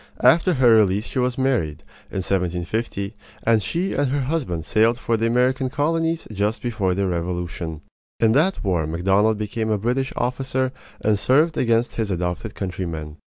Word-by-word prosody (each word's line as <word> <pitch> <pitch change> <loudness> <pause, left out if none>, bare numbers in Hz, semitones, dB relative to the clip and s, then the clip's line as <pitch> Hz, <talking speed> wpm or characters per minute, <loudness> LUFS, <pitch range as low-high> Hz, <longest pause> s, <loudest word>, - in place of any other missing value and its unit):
After 170 +1 +5
her 125 -3 +5
release 105 -1 +3
she 130 - -3
was 125 0 0
married, 120 - 0 0.3
in 95 - -3
1750; 95 +3 -2 0.3
and 115 -1 +3
she 175 - -1
and 145 0 +1
her 140 +1 0
husband 130 - -2
sailed 115 +2 +3
for 115 -1 0
the 115 +1 +1
American 125 +2 +2
colonies 165 +3 0
just 105 +2 -1
before 105 -7 0
the 100 +1 0
Revolution. 85 -2 -3 0.4
In 110 -1 +4
that 160 +10 +2
war 90 -6 0
Macdonald 95 +6 +2
became 110 +1 -3
a 105 - +2
British 125 +6 -1
officer 130 +1 -1 0.3
and 105 -1 +2
served 150 +8 +3
against 115 0 +1
his 110 -3 -1
adopted 90 +3 -3
countrymen. 85 -5 -5
110 Hz, 160 wpm, -22 LUFS, 95-130 Hz, 0.4 s, After